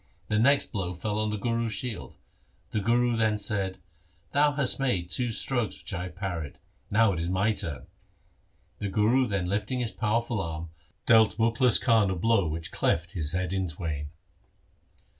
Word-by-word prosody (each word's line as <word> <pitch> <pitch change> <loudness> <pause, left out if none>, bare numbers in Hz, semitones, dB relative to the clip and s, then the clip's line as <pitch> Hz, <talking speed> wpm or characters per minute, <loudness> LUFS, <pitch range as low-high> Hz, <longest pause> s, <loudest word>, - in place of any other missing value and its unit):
The 105 - +2
next 140 +5 +3
blow 90 -3 -3
fell 105 +4 -2
on 110 0 0
the 105 - -2
Guru's 115 +1 -1
shield. 120 +1 -5 0.6
The 110 - 0
Guru 120 +3 +2
then 110 -2 +2
said, 100 -3 -2 0.3
' 85 0 -37
Thou 145 +1 +4
hast 140 -3 +1
made 95 -11 0
two 125 -2 0
strokes 120 0 -1
which - - -6
I 90 -1 -3
have 90 - -9
parried. 90 -6 -4 0.3
Now 110 -1 +4
it 85 - -3
is 85 +1 -2
my 95 +4 +2
turn.' 70 -10 -3 0.9
The 100 - -2
Guru 115 +6 +3
then 100 -4 -1
lifting 105 +6 -1
his 120 -2 -1
powerful 115 0 0
arm 80 -2 -5 0.3
dealt 110 -2 +5
Mukhlis 115 +1 +3
Khan 110 -4 +3
a 95 - -1
blow 100 0 +2
which 80 +1 -4
cleft 85 +1 0
his 80 -5 -3
head 90 0 -1
in 95 -1 0
twain. 75 -2 -4
105 Hz, 180 wpm, -28 LUFS, 90-115 Hz, 0.9 s, dealt